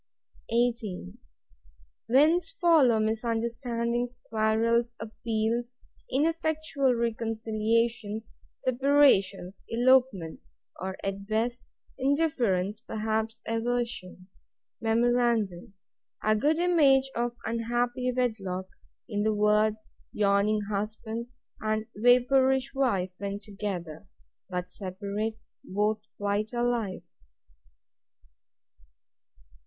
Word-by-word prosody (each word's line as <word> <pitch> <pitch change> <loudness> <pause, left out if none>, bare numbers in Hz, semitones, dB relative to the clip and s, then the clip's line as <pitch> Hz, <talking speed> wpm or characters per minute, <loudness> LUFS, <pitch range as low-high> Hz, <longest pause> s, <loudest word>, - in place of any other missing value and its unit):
18. 230 - -1 0.9
Whence 315 +7 +4
follow 310 -11 +4
misunderstandings, 235 +2 -1
quarrels, 230 +2 +2
appeals, 230 +2 -2 0.4
ineffectual 310 -2 +1
reconciliations, 225 -1 -1 0.2
separations, 250 -8 +2
elopements; 240 - +2 0.3
or, 190 0 -4
at 195 0 -4
best, 235 +3 -1 0.3
indifference; 245 - +1
perhaps, 220 0 -2
aversion.—Memorandum; 225 -1 -1 0.5
A 215 0 +3
good 295 +9 +2
image 295 -7 +4
of 240 0 -1
unhappy 240 +2 -1
wedlock, 210 -7 -2 0.4
in 205 -4 -2
the 215 0 +1
words 210 +1 +2 0.2
YAWNING 205 +1 +2
HUSBAND, 220 +3 -3 0.3
and 215 0 -1
VAPOURISH 250 +3 +4
WIFE, 200 -10 0
when 200 0 -3
together: 195 -4 -6 0.4
But 180 -1 -4
separate, 200 +4 -4 0.3
both 210 +2 0 0.2
quite 205 +2 -1
alive. 240 -7 -1
225 Hz, 75 wpm, -28 LUFS, 210-245 Hz, 0.9 s, Whence